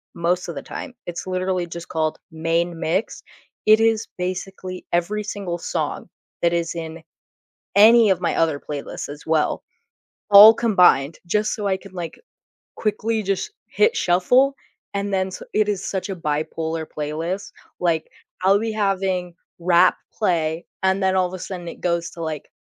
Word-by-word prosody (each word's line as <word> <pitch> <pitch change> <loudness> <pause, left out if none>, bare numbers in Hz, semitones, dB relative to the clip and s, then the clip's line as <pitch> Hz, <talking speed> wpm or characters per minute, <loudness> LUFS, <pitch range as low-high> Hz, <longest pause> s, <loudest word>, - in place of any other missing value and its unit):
most 175 +2 0
of 170 - -6
the - - -5
time, 260 - -7
it's 175 +1 -6
literally 185 -1 -1
just 170 0 -8
called 155 -1 -1
Main 165 +1 -1
Mix- 180 +6 -1 0.4
it 215 +1 +7
is 225 0 +2
basically 185 0 -5
every 205 +5 0
single 195 -4 -4
song - - -3 0.3
that 170 0 +2
is 170 -1 -1
in 165 0 -6 0.7
any 225 +2 +7
of 185 -2 +2
my 170 - 0
other 160 -3 +2
playlists 145 -1 -6
as 145 +1 -10
well, 160 -1 +1 0.7
all 205 +2 +11
combined, 180 -10 +3
just 210 +4 0
so 210 -2 -4
I 190 - +1
can, 195 0 -14
like, 175 -3 -6 0.6
quickly 220 +1 -1
just 195 - -2 0.2
hit 445 +2 +2
shuffle, 250 +10 +3 0.4
and 200 0 -2
then 190 0 0
su - - -8
it 215 -1 +2
is 195 -2 -2
such 190 0 -3
a 190 - -3
bipolar 160 +1 -2
playlist, 160 +6 -4 0.3
like, 165 -3 0 0.3
I'll 195 +2 +5
be 225 0 -2
having 190 -4 -1 0.2
rap 175 +1 +4 0.2
play, 165 -5 0 0.2
and 190 +1 +2
then 190 0 +2
all 185 -1 +3
of 180 - -11
a 185 - -6
sudden 175 -1 -6
it - - -8
goes 170 -1 0
to, 170 - -9
like, 155 -2 -5
180 Hz, 165 wpm, -22 LUFS, 165-200 Hz, 0.7 s, all